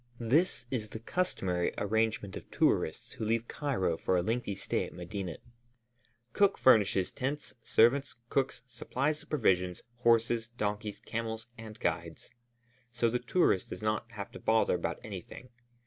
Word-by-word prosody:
This 130 +3 +2
is 110 -5 -2
the 110 - -6
customary 95 - -1
arrangement 110 -1 0
of - - -8
tourists - - +1
who - - -6
leave 115 +2 0
Cairo 105 - -1
for 90 - +1
a 90 - +1
lengthy 115 -1 -1
stay - - -1
at - - -8
Medinet. 90 -1 -5 0.9
Cook 200 -1 +4
furnishes 100 -6 +4
tents, 140 +2 -3
servants, 130 +5 +3
cooks, 135 0 0
supplies 135 +5 -2
of - - -18
provisions, 90 - +1
horses, 115 -1 +3
donkeys, 105 -2 -3
camels, 110 0 -4
and 110 -2 -10
guides; - - -3 0.6
so 115 -1 +1
the 125 - +1
tourist 125 - +2
does - - -6
not 110 +2 0
have 100 -2 -6
to - - -9
bother 110 0 +3
about 85 -1 -1
anything. 105 +4 -8
110 Hz, 145 wpm, -31 LUFS, 100-125 Hz, 0.9 s, Cook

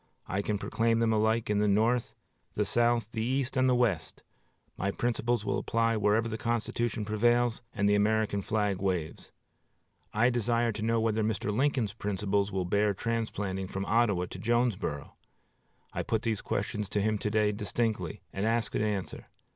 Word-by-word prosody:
I 95 +2 -1
can 105 0 -1
proclaim 115 +3 +1
them 115 -1 +2
alike 110 +1 +2
in 105 -1 +1
the 105 - +2
North, 115 +4 +2 0.4
the 105 - +1
South, 120 0 +2
the 110 - -3
East, 130 +2 -1
and 130 -1 +3
the 125 - +4
West. 110 -10 0 0.5
My 100 - -1
principles 120 +2 -1
will - - 0
apply 115 0 +1
wherever 110 +2 +2
the 110 -1 -4
Constitution 115 -1 -1
prevails 120 +3 +2
and 100 -1 0
the 105 - +4
American 105 0 +2
flag 105 -2 -1
waves. 90 -5 -2 0.8
I 120 +4 +3
desire 120 0 +1
to 105 0 -6
know 115 +1 +1
whether 110 -1 +1
Mr. 105 -1 -1
Lincoln's 125 -5 +1
principles 100 -1 -1
will 95 -2 -1
bear 100 +2 +1
transplanting 105 -4 -2
from 95 +1 -4
Ottawa 105 -6 +2
to 95 - -7
Jonesboro? 115 - -1 0.8
I - - -1
put 110 - -1
these 110 -3 -1
questions 105 0 -2
to 105 - 0
him 110 -1 +1
to 105 - -1
day 105 -1 +2
distinctly, 105 -3 -2
and 95 - -2
ask 115 +1 0
an - - 0
answer. 105 -3 -3
110 Hz, 170 wpm, -29 LUFS, 100-115 Hz, 0.8 s, the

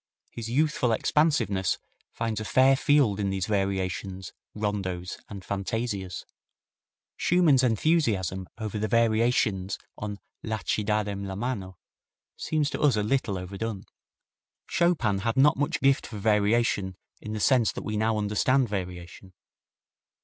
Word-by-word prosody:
His 115 -1 -6
youthful 135 -2 +1
expansiveness 110 - +1 0.3
finds 115 -2 -2
a - - -4
fair 130 +4 +5
field 135 -8 +3
in 100 -1 0
these 95 -1 -1
variations, 95 -2 -2 0.2
rondos 95 -4 -3
and 100 -3 -8
fantasias. 100 -3 -3 0.9
Schumann's 165 -7 +4
enthusiasm 110 - +1
over 110 -2 -4
the 110 - 0
variations 110 -4 +2 0.2
on 105 -1 -4 0.2
"La 110 -1 -2
ci 105 - 0
darem 105 -2 -1
la 95 - -5
mano" 100 -5 -4 0.6
seems 155 -2 -1
to - - -4
us 145 -6 +4
a 105 - 0
little 105 -4 0
overdone. 100 +3 -5 0.8
Chopin 135 - +1
had 115 +5 -1
not 145 +2 +6
much 145 0 -1
gift 135 -1 +3
for 110 - -7
variation 105 -2 +1 0.3
in 110 - -6
the 110 - -3
sense 120 0 +3
that - - -6
we 105 - -2
now 110 +1 +1
understand 105 +5 +2
variation. 90 -2 -6
105 Hz, 135 wpm, -27 LUFS, 95-125 Hz, 0.9 s, not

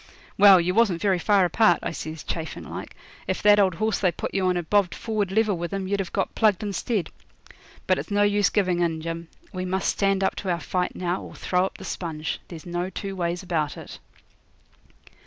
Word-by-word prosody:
'Well, 195 -2 +8
you 175 +1 0
wasn't 205 -5 +3
very 190 -2 +1
far 200 -1 +3
apart,' 175 0 +4
I - - -2
says, 155 -1 -6
chaffing 160 -1 -5
like. - - -8 0.3
'If - - -2
that 210 0 +6
old 190 -4 +3
horse 215 +3 0
they 185 -3 +2
put - - -5
you 190 -1 +1
on 180 - +2
had 175 -2 -3
bobbed 200 -2 +2
forward 215 -4 -2
level 215 -1 +2
with 170 0 -4
him 195 -1 -3
you'd 200 +1 -1
have 190 -3 -3
got - - -1
plugged 215 -2 +2
instead. 205 0 -2 0.7
But - - +2
it's - - -6
no 205 0 +2
use 205 0 +3
giving 185 -4 +1
in, 165 -2 0
Jim. 165 +1 -5 0.3
We 185 0 -3
must 185 +1 -1
stand 195 -1 +1
up - - +1
to 195 - -4
our 170 -1 0
fight 180 +2 -2
now, 180 0 -2
or - - -10
throw 180 0 +1
up - - -12
the 190 - -10
sponge. 155 -5 -4
There's 165 -3 -10
no 175 +1 -3
two 195 +1 -5
ways 175 0 -2
about 160 -5 -1
it.' - - -10
185 Hz, 215 wpm, -25 LUFS, 175-200 Hz, 0.7 s, Well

